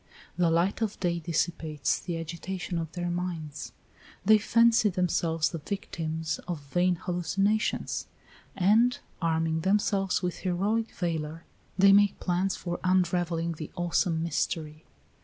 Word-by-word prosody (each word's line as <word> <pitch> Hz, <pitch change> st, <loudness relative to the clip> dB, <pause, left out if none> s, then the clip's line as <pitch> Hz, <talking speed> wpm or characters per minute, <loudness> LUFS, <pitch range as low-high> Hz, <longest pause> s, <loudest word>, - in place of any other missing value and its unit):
The 175 Hz, -1 st, +2 dB
light 170 Hz, +6 st, +1 dB
of 215 Hz, -2 st, -2 dB
day 175 Hz, -2 st, 0 dB
dissipates 160 Hz, -2 st, -1 dB
the 175 Hz, -2 st, -4 dB
agitation 170 Hz, +2 st, -4 dB
of 165 Hz, -1 st, -4 dB
their 175 Hz, -1 st, -2 dB
minds, 175 Hz, -4 st, -4 dB, 0.5 s
they 215 Hz, +1 st, +7 dB
fancy 230 Hz, 0 st, +4 dB
themselves 170 Hz, -3 st, +1 dB
the 165 Hz, -, -4 dB
victims 160 Hz, -3 st, -3 dB
of 175 Hz, -4 st, -3 dB
vain 175 Hz, +6 st, +1 dB
hallucinations, 195 Hz, +5 st, -1 dB, 0.5 s
and, 220 Hz, +6 st, +4 dB, 0.2 s
arming 160 Hz, -1 st, +1 dB
themselves 195 Hz, 0 st, +1 dB
with 180 Hz, -2 st, -2 dB
heroic 205 Hz, +5 st, 0 dB
valor, 165 Hz, -2 st, -3 dB, 0.3 s
they 195 Hz, +1 st, +7 dB
make 205 Hz, 0 st, +4 dB
plans 185 Hz, +2 st, 0 dB
for 175 Hz, -1 st, -4 dB
unravelling 175 Hz, -2 st, +1 dB
the 155 Hz, -2 st, -6 dB
awesome 175 Hz, -1 st, +1 dB
mystery. 155 Hz, -1 st, -2 dB
175 Hz, 125 wpm, -28 LUFS, 165-195 Hz, 0.5 s, they